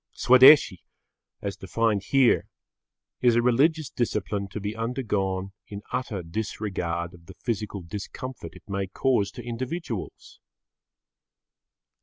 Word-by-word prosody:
Swadeshi, 130 - +7 0.6
as 100 -1 -3
defined 100 +1 0
here, 135 -1 +3 0.7
is 120 -2 +4
a 120 - +4
religious 145 +5 +2
discipline 105 -4 -2
to 100 +2 -6
be 105 +2 -4
undergone 105 -5 -2 0.2
in 100 0 -8
utter 120 -7 -3
disregard 85 -2 -3
of 85 -1 -17
the 95 - -12
physical 105 -4 -4
discomfort 105 +7 -7
it - - -16
may 100 -1 -2
cause 105 0 +1
to 120 - -9
individuals. 120 - -5
105 Hz, 115 wpm, -26 LUFS, 95-125 Hz, 0.7 s, Swadeshi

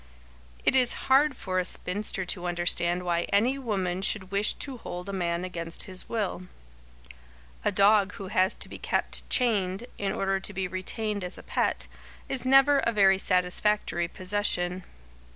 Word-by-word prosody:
It - - +3
is 250 -2 +5 0.2
hard 285 +1 +4
for 185 -1 -2
a - - +1
spinster 190 +1 -1
to 180 0 -2
understand 175 0 +2
why 170 -1 -1
any 240 +7 +2
woman 190 -7 -2
should 195 -1 -2
wish 200 +1 +2
to 270 -3 -5
hold 180 -2 -7
a 200 - -5
man 175 -1 -1
against 170 -2 -4
his 185 -2 -2
will. 200 -5 -3 1.2
A - - +1
dog 205 0 +4
who 195 -1 -8
has 190 -2 +2
to - - -4
be - - -10
kept - - -1
chained, 210 -4 0
in 195 -1 -1
order 195 0 -1
to 200 +2 -5
be 190 -1 -2
retained 200 +2 -3
as 180 - 0
a - - -11
pet, - - -1 0.4
is 265 -2 -2
never 270 +2 +6
a 235 - +1
very 195 -3 +4
satisfactory 180 -1 +1
possession. 185 -1 -1
195 Hz, 165 wpm, -27 LUFS, 180-215 Hz, 1.2 s, never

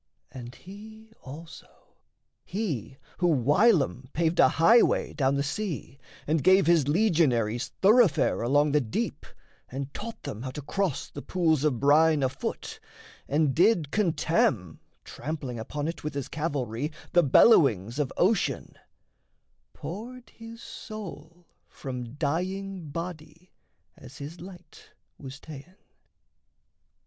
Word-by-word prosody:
And 120 -1 -9
he 220 - -13
also, 155 +5 -13 0.4
he 155 - -4 0.2
Who 175 - +2
whilom 145 - +2
paved 165 +1 0
a - - +7
highway 225 +9 +4
down 135 -2 +1
the 140 - 0
sea, 145 - -4 0.3
And 155 -1 0
gave 190 0 +5
his 165 -5 +3
legionaries 140 - +2 0.2
thoroughfare 210 -5 +4
Along 145 +5 +2
the 150 +1 +3
deep, 110 -4 -4 0.4
and 135 +2 -6
taught 230 +2 -7
them 105 - -6
how 130 - -4
to 140 +3 -7
cross 190 -1 -2
The 145 - -9
pools 160 -5 +1
of 140 -6 +1
brine 150 +1 +4
afoot, 130 - -4 0.5
and 150 -1 +1
did 175 - +3
contemn, 155 - 0 0.2
Trampling 145 -6 -6
upon 145 +6 -4
it 165 - -5
with 150 -1 -4
his 140 -3 -4
cavalry, 140 -3 -3 0.2
The 175 - +6
bellowings 135 - +4
of 140 -3 -1
ocean 195 +2 +1 1.0
poured 230 - -8
his 230 0 -12
soul 175 -5 -9 0.2
From 125 -2 -7
dying 180 +3 -3
body, 165 +1 -8 0.4
as 130 0 -14
his 150 +5 -9
light 180 -1 -13 0.3
was 135 -1 -9
ta'en. 155 +4 -12
155 Hz, 120 wpm, -27 LUFS, 135-185 Hz, 1.0 s, a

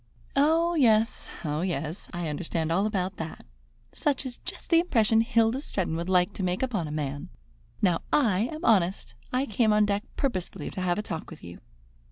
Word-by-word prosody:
"Oh, 325 +4 +3
yes, 230 -6 +2 0.2
oh, 150 +1 -1
yes; 165 -1 -3
I 175 -2 -3
understand 160 +1 -2
all 195 +5 +2
about 195 -2 -2
that. 160 0 -7 0.5
Such 285 -3 0
is 250 -2 -6
just - - -5
the 330 - +7
impression 225 -10 +3
Hilda 230 +3 +2
Stretton 185 - -2
would 170 +2 -3
like 180 +1 +3
to - - -6
make 185 +4 0
upon 210 -11 -1
a - - -6
man. 145 -2 -4 0.5
Now 180 -4 +3
I 225 -5 +3
am 315 +2 -6
honest. 190 - +2 0.2
I 255 +2 +1
came 220 -1 +2
on 210 0 +4
deck 205 0 0 0.2
purposely 185 - -2
to 185 - -5
have 175 -1 +1
a 210 - -2
talk 165 -6 -5
with 165 - -12
you." 85 0 -9
200 Hz, 190 wpm, -27 LUFS, 170-235 Hz, 0.5 s, the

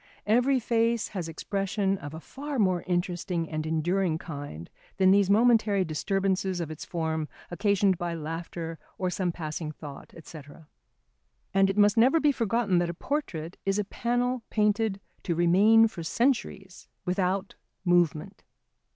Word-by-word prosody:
Every 250 +5 +3
face 230 -1 +1
has 180 -5 -4
expression 195 +3 -1
of 145 +2 -8
a - - -6
far 275 - -6
more 185 -5 +2
interesting 175 -1 -1
and 155 0 -3
enduring 165 +2 0
kind 145 - -7 0.3
than 190 -1 +5
these 200 -1 +4
momentary 215 -3 +4
disturbances 190 +3 -1
of 165 -2 -4
its 155 - -7
form 160 -3 -2 0.2
occasioned 200 0 +2
by 175 -1 -2
laughter 165 +1 -5 0.2
or 185 -1 -1
some 180 -1 -1
passing 155 -1 -5
thought, 145 -2 -10
&c. 160 - -10 1.1
And 195 0 +4
it 195 - -2
must 205 0 +4
never 260 +8 +5
be 295 -2 +4
forgotten 230 -6 +1
that 175 -1 0
a 170 - -4
portrait 185 - -4
is 195 0 0
a 210 - +1
panel 245 +3 -1
painted 210 -1 +1 0.2
to 170 - -2
remain 200 +7 +5
for 205 -6 -8
centuries 195 -2 -1 0.2
without 185 +1 -1 0.3
movement. 175 +1 +1
190 Hz, 145 wpm, -27 LUFS, 165-210 Hz, 1.1 s, than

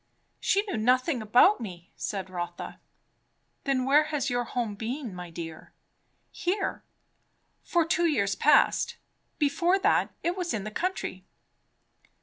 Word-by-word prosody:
"She 400 - +2
knew 315 - -2
nothing 255 +4 +2
about 245 - +5
me," 175 -5 -8
said 190 -2 -4
Rotha. 175 -1 -5 0.9
"Then 265 -2 +1
where 295 +3 +5
has 290 -4 -1
your 245 0 0
home 235 -3 -2
been, 230 +2 -4
my 180 -1 -7
dear?" 165 -1 -8 0.6
"Here, 390 +3 -2 0.8
for 340 -2 +2
two 340 +1 +2
years 200 -11 +1
past. 300 - +3 0.4
Before 340 +6 +2
that, 390 - +2
it 345 +1 0
was 355 -8 -2
in 205 - -3
the 215 - -5
country." 215 - -3
250 Hz, 135 wpm, -28 LUFS, 200-330 Hz, 0.9 s, about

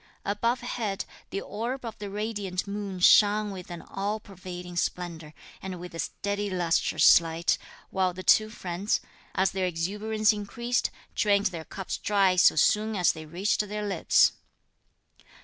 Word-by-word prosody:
Above 230 +5 0
head, 225 -5 -3 0.2
the 195 - -3
orb 240 +4 -4
of 225 - -5
the 205 -1 -5
radiant 205 -3 -3
moon 200 -2 -5
shone 210 +3 +5
with 185 -2 -8
an 175 -1 -7
all 205 +2 -3
pervading 180 -3 -9
splendour, 170 -3 -3 0.3
and 185 -2 -6
with 180 0 -9
a 165 - -7
steady 205 +3 -2
lustrous 175 -2 +4
light, 165 0 -1 0.3
while 185 -1 +1
the 185 +1 -8
two 215 +3 +5
friends, 190 -1 -2 0.4
as 190 +1 +2
their 190 -1 -1
exuberance 210 +6 +1
increased, 230 +4 -1 0.2
drained 200 -1 +2
their 160 -2 -6
cups 195 -2 -5
dry 195 -2 +3
so 180 - +6
soon 215 +7 +2
as 180 -3 +4
they 155 -1 -9
reached 180 +6 0
their 210 0 -3
lips. 195 -4 +4
195 Hz, 150 wpm, -27 LUFS, 180-210 Hz, 0.4 s, so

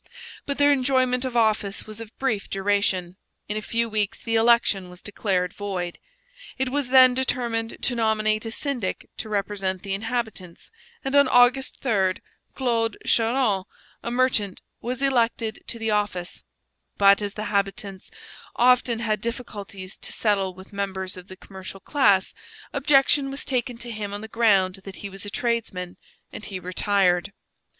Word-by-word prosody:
But 280 - -2
their 290 0 +5
enjoyment 260 -2 +2
of 250 -2 -2
office 215 -3 +1
was 215 +1 -8
of 225 - -8
brief 225 -7 -1
duration; 195 -2 0 0.3
in 210 - -3
a 215 - -2
few 230 +2 0
weeks 210 -2 -1
the 230 - -4
election 225 -5 +3
was 180 0 -13
declared 190 -3 -1
void, 185 -4 -4 0.6
It 265 -1 0
was 280 -1 -1
then 255 -1 +8
determined 235 -3 -1
to 255 - +1
nominate 215 -2 +1
a - - -4
syndic 245 -6 -3
to 220 - -5
represent 195 -2 -2
the 195 - -3
inhabitants, 220 -4 -4 0.3
and 270 - -2
on 285 -1 +6
August 250 +2 +4
3 195 -7 +2 0.4
Claude 230 -4 0
Charron, 225 -4 +2 0.4
a - - -4
merchant, 240 -6 +1 0.2
was 255 +3 -3
elected 230 -4 +1
to - - -4
the 225 -1 -1
office; 205 -4 -1 0.6
but, 200 0 +6
as 205 -1 -4
the 215 - -4
habitants 200 -1 -2 0.5
often 245 -1 +3
had 215 -3 0
difficulties 205 -5 -6
to - - -6
settle 195 -4 0
with 190 +2 -14
members 190 -2 -3
of 180 0 -11
the 185 - -11
commercial 190 0 -10
class, 200 -5 +2 0.4
objection 275 0 +4
was 275 +1 -4
taken 245 -2 -1
to 235 0 -7
him 205 -2 -4
on 205 - -6
the 220 - -7
ground 200 -5 +3
that 195 -1 -9
he 200 - -5
was 195 +1 -8
a - - -4
tradesman, 200 -6 -2 0.4
and 210 - -8
he 195 -3 -5
retired. 185 0 +1
215 Hz, 160 wpm, -24 LUFS, 195-245 Hz, 0.6 s, then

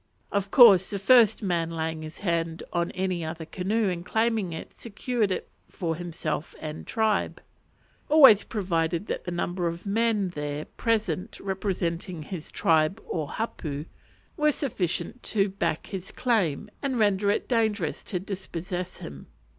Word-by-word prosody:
Of 200 -1 0
course 200 -7 +8
the 200 - -2
first 220 +1 +5
man 170 -4 0
laying 160 -1 -3
his 155 0 -9
hand 165 -3 -1
on 170 -1 +1
any 185 -2 -1
other 160 +1 -5
canoe 200 +6 0
and 175 -2 -2
claiming 220 -2 0
it 160 - -7
secured 235 0 -2
it 185 - -2 0.2
for 165 -3 -2
himself 165 -2 -4
and 155 0 -7
tribe; 220 -3 0 0.7
always 275 -9 +8
provided 170 -3 -1
that - - -4
the 180 - -3
number 175 0 -1
of 170 +3 -5
men 210 -1 +1
there 150 -2 -4
present 225 -5 -1
representing 185 -4 -2
his 165 0 -7
tribe 160 +5 +2
or 155 -4 -3
hapu 155 -10 -4 0.5
were 300 -1 +4
sufficient 240 - -2
to 200 -2 +1
back 190 -4 -2
his 190 -1 -6
claim 215 - 0
and 270 -3 -1
render 205 -2 +2
it 205 - 0
dangerous 220 - 0
to 185 - -2
dispossess 185 -1 -5
him. 70 -2 -9
185 Hz, 145 wpm, -27 LUFS, 165-215 Hz, 0.7 s, course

